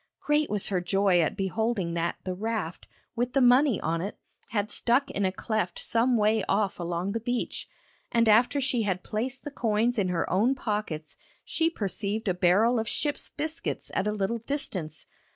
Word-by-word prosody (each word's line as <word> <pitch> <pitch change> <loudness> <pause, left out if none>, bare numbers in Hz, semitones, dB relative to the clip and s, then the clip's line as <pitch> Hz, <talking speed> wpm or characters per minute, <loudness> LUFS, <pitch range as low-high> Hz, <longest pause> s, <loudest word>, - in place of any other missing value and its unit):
Great 295 0 +1
was 210 -2 +4
her 185 -3 0
joy 190 0 +3
at 160 - -1
beholding 195 -2 -1
that 170 0 -1
the 185 - -3
raft, 205 -3 -4 0.3
with 245 +1 -1
the 275 - +3
money 250 0 +5
on 165 +1 -1
it, 200 +4 -5 0.3
had 210 -2 -1
stuck 255 +4 +2
in 200 - 0
a 185 - +1
cleft 195 -2 -2
some 235 +1 +1
way 215 0 +2
off 200 -1 +1
along 175 +2 -2
the 230 - -2
beach, 245 +2 -3 0.4
and 230 -1 +3
after 235 +6 +4
she 260 -3 0
had 190 -4 -1
placed 250 +5 -3
the 290 - -6
coins 230 -1 +1
in 195 - +1
her 175 -2 -1
own 225 +9 +2
pockets 205 -10 -4 0.3
she 325 0 +1
perceived 210 - -3
a 185 - +3
barrel 200 +7 +3
of 220 - -2
ship's 295 -1 -2
biscuits 315 +2 -3
at 205 - 0
a - - +1
little 210 +3 -1
distance. 195 - -2
215 Hz, 185 wpm, -27 LUFS, 185-245 Hz, 0.4 s, money